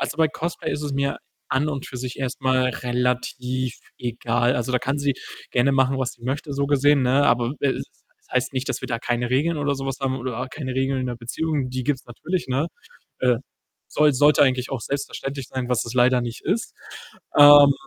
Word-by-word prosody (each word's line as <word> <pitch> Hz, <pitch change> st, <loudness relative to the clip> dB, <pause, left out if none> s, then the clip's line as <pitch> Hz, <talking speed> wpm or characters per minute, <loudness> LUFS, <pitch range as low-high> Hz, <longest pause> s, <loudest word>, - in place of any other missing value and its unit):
Also, -, -, -2 dB
bei 160 Hz, -1 st, +4 dB
Cosplay 170 Hz, +3 st, -4 dB
ist 150 Hz, -, -3 dB
es 145 Hz, -1 st, -3 dB
mir 140 Hz, 0 st, -1 dB, 0.3 s
an 145 Hz, +3 st, +1 dB
und 140 Hz, -3 st, -4 dB
für 130 Hz, -, -8 dB
sich 125 Hz, 0 st, -5 dB
erst 130 Hz, -2 st, -3 dB
mal 130 Hz, -1 st, +2 dB
relativ 125 Hz, 0 st, -2 dB, 0.2 s
egal. 120 Hz, 0 st, 0 dB
Also, 120 Hz, +1 st, -2 dB
da 125 Hz, -, +3 dB
kann 135 Hz, +3 st, -2 dB
sie 140 Hz, -1 st, +1 dB, 0.4 s
gerne 125 Hz, +3 st, +3 dB
machen, 135 Hz, 0 st, +2 dB
was 130 Hz, -2 st, -1 dB
sie 120 Hz, -, -21 dB
möchte, 140 Hz, +3 st, -3 dB
so 140 Hz, 0 st, 0 dB
gesehen, 145 Hz, 0 st, +4 dB
ne? 130 Hz, +3 st, +3 dB
Aber 120 Hz, 0 st, +2 dB
w 145 Hz, -, -7 dB
äh, -, -, +3 dB
es -, -, -4 dB, 0.3 s
es -, -, -33 dB
heißt 130 Hz, +1 st, +1 dB
nicht, 130 Hz, +1 st, -2 dB
dass -, -, -2 dB
wir -, -, -5 dB
da 115 Hz, -2 st, -1 dB
keine 120 Hz, 0 st, -1 dB
Regeln 150 Hz, +5 st, +1 dB
oder 145 Hz, -1 st, 0 dB
so 135 Hz, 0 st, -5 dB
was 135 Hz, -1 st, -3 dB
haben 135 Hz, -1 st, 0 dB
oder 125 Hz, -1 st, -4 dB
keine 130 Hz, -2 st, -5 dB
Regeln 135 Hz, 0 st, 0 dB
in 130 Hz, -, -2 dB
der 120 Hz, -1 st, -4 dB
Beziehung, 140 Hz, +4 st, -2 dB
die 130 Hz, 0 st, -3 dB
gibt's 135 Hz, -1 st, -1 dB
natürlich, 165 Hz, +9 st, -3 dB
ne? 135 Hz, +6 st, 0 dB, 0.5 s
Äh, 125 Hz, -2 st, +3 dB, 0.5 s
soll 150 Hz, -2 st, +3 dB
sollte 145 Hz, +3 st, +5 dB
eigentlich 130 Hz, -2 st, +1 dB
auch 135 Hz, -, -3 dB
selbstverständlich 140 Hz, +1 st, -4 dB
sein, 130 Hz, -2 st, -4 dB
was 125 Hz, -2 st, +1 dB
es 115 Hz, -, -6 dB
leider 125 Hz, 0 st, +4 dB
nicht 120 Hz, 0 st, -5 dB
ist, 205 Hz, +7 st, -1 dB, 0.7 s
ähm, 145 Hz, -1 st, +10 dB
130 Hz, 220 wpm, -23 LUFS, 125-140 Hz, 0.7 s, ähm